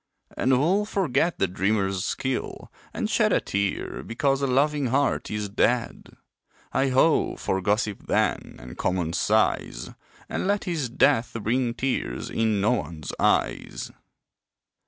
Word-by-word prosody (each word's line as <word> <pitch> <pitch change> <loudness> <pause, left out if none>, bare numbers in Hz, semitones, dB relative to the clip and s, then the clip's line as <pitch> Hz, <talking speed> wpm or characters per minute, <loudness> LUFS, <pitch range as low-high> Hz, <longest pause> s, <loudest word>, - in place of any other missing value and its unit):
And 130 - +1
who'll 175 +11 +2
forget 175 - +1
the 95 - +1
dreamer's 95 +1 0
skill, 130 -1 -3 0.2
and - - -2
shed - - +2
A - - +4
tear 100 0 -2
because 135 +3 0
a 140 - +1
loving 140 +2 +2
heart 135 +3 0
is 105 -1 -2
dead? 115 +4 -1 0.6
Heigh 135 - +2
ho 135 +5 +3
for 95 - -2
gossip 105 +1 -1
then, - - 0
and 60 0 -11
common 90 -2 -1
sighs - - 0 0.4
And - - -2
let 205 0 +1
his 160 -8 -2
death 115 0 +2
bring 120 +1 0
tears 130 +1 -2
in 110 -2 +1
no 105 +4 +2
one's 85 -10 -3
eyes. - - 0
120 Hz, 135 wpm, -25 LUFS, 100-135 Hz, 0.6 s, A